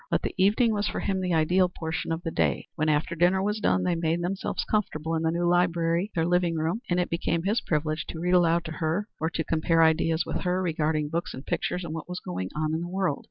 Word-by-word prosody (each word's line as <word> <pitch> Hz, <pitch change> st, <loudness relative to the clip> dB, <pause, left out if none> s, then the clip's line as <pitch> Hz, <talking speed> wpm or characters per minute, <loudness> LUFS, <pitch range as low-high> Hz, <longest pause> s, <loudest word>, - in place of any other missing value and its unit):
But -, -, 0 dB
the -, -, -2 dB
evening 210 Hz, +4 st, +3 dB
was 205 Hz, 0 st, 0 dB
for -, -, -3 dB
him 190 Hz, -1 st, -1 dB
the 180 Hz, -2 st, 0 dB
ideal 180 Hz, +4 st, +3 dB
portion 160 Hz, -2 st, -4 dB
of 165 Hz, +1 st, -2 dB
the 165 Hz, -, -3 dB
day; -, -, 0 dB
when, 155 Hz, 0 st, 0 dB
after 150 Hz, +3 st, +1 dB
dinner 175 Hz, +3 st, +3 dB
was 210 Hz, +1 st, -1 dB
done, 190 Hz, -, +2 dB
they 180 Hz, -1 st, +1 dB
made 165 Hz, +1 st, 0 dB
themselves 190 Hz, +2 st, -2 dB
comfortable 165 Hz, -7 st, -1 dB
in 160 Hz, -, 0 dB
the 160 Hz, -, +1 dB
new 170 Hz, +1 st, 0 dB
library, 175 Hz, +1 st, +2 dB
their 165 Hz, -1 st, +1 dB
living 175 Hz, -1 st, +2 dB
room, 165 Hz, +8 st, -1 dB
and 175 Hz, 0 st, +2 dB
it 180 Hz, -, +1 dB
became 170 Hz, 0 st, -1 dB
his 210 Hz, +5 st, +1 dB
privilege 155 Hz, 0 st, -1 dB
to 160 Hz, -, -6 dB
read 180 Hz, +2 st, 0 dB
aloud 170 Hz, -1 st, +3 dB
to 160 Hz, -, -5 dB
her 165 Hz, +6 st, -1 dB
or 160 Hz, -, 0 dB
to 165 Hz, 0 st, -2 dB
compare 165 Hz, +1 st, +2 dB
ideas 160 Hz, 0 st, +2 dB
with -, -, -2 dB
her 180 Hz, 0 st, 0 dB
regarding 155 Hz, -4 st, 0 dB
books 170 Hz, +2 st, -3 dB
and 130 Hz, -, -9 dB
pictures 180 Hz, -, -2 dB
and 160 Hz, -2 st, -5 dB
what 165 Hz, +2 st, -6 dB
was 180 Hz, -, -4 dB
going 90 Hz, +1 st, -4 dB
on 155 Hz, 0 st, -1 dB
in 160 Hz, -, -1 dB
the 175 Hz, -, -5 dB
world. 185 Hz, -5 st, -1 dB
170 Hz, 255 wpm, -27 LUFS, 160-180 Hz, -, evening